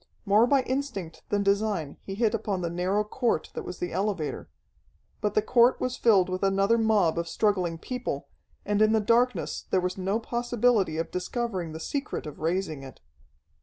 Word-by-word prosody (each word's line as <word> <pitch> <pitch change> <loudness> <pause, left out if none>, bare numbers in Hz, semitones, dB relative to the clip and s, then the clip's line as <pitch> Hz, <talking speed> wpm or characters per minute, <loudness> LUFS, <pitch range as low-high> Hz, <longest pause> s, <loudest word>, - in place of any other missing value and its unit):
More 210 +4 +5
by 275 0 +3
instinct 255 - -4
than 205 -1 +1
design 200 -7 0
he 195 - -6
hit 220 0 +1
upon 205 -4 -2
the 170 -1 -2
narrow 185 +4 0
court 225 -4 -1
that - - -4
was 180 - -7
the 175 - -4
elevator. 190 -4 -2 0.7
But 210 -1 -1
the 215 - +3
court 240 +2 +4
was 255 0 -1
filled 205 -8 +4
with 185 0 -3
another 195 +3 +3
mob 205 -7 +3
of 170 - -3
struggling 185 -4 0
people, 250 +8 -4 0.4
and 205 0 +1
in 215 0 +5
the 220 - +4
darkness 235 +4 +1
there 185 - +3
was 180 +1 -2
no 195 +4 0
possibility 235 -7 +1
of 165 0 -3
discovering 185 -2 -3
the 160 - -6
secret 275 - -3
of 150 - -8
raising 160 -2 -1
it. 130 -3 -11
200 Hz, 180 wpm, -27 LUFS, 180-230 Hz, 0.7 s, More